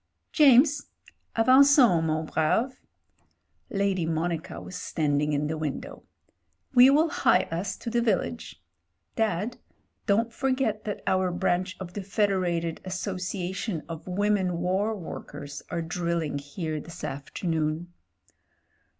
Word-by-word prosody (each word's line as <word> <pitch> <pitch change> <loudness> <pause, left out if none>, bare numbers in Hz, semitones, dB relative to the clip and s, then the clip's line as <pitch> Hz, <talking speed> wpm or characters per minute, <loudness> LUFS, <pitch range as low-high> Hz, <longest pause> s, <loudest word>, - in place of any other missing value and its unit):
"James 285 0 +5 0.2
— - - -39
^avangons, 255 - +6
mon 155 0 0
brave.*' 225 - 0 0.9
Lady 195 -3 0
Monica 165 +1 -2
was 185 - -9
standing 150 -3 0
in 145 0 0
the 155 +1 -3
window. 250 - -5 0.7
"We 255 +1 +8
will 310 +4 +4
hie 185 -10 +3
us 185 +4 -3
to 230 - -6
the 240 0 +2
village. 175 - -2 0.5
Dad, 220 +1 -1 0.5
don't 225 +3 +2
forget 255 -6 -1
that 205 - -4
our 185 -1 +2
branch 180 +1 -1
of 180 -2 -7
the 205 - -4
Fed 200 +1 +1
erated 170 -3 -1
Association 185 -1 -3
of 165 0 -8
Women 190 -1 +1
War 190 +5 0
Workers 145 -5 -8
are 170 - -2
drill 170 0 -1
ing 145 -2 -3
here 155 +2 -4
this 165 - -11
afternoon." 160 +4 -3
185 Hz, 125 wpm, -27 LUFS, 165-220 Hz, 0.9 s, We